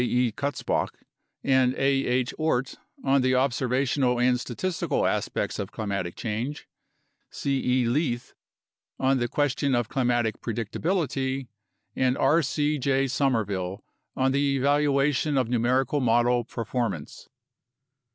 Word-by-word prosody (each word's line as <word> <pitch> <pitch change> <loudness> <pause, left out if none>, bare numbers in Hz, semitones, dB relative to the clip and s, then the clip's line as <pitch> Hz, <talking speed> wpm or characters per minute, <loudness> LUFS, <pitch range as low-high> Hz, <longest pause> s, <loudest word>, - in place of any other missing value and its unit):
E. 125 -1 +1
Kutz 140 -3 -3
bach - - -1 0.5
and 130 -1 +3
A. - - -11 0.3
H. 125 0 0
Oort 135 -5 0 0.3
on 135 0 +3
the 130 0 +2
observational 130 0 +1
and 125 0 +3
statistical 165 +9 -2
aspects - - -1
of 100 0 -4
climatic 100 -5 -3
change; 120 +7 -4 0.6
C. 135 -1 -2
E. 125 0 +2
Leith 120 -1 -1 0.7
on 135 0 +2
the 120 - 0
question 140 0 0
of 120 -2 0
climatic 120 -4 0
predictability; 130 - -2 0.5
and 130 0 +1
R. 150 +5 +4
C. 150 +1 0
J. 135 +1 +2
Somerville 105 -8 -1 0.3
on 130 0 +2
the 140 0 +1
evaluation 145 +1 +2
of 125 -3 +1
numerical 125 +4 +1
model 120 0 +3
perfor 120 0 -2
mance. 80 -7 -8
130 Hz, 125 wpm, -26 LUFS, 120-140 Hz, 0.7 s, R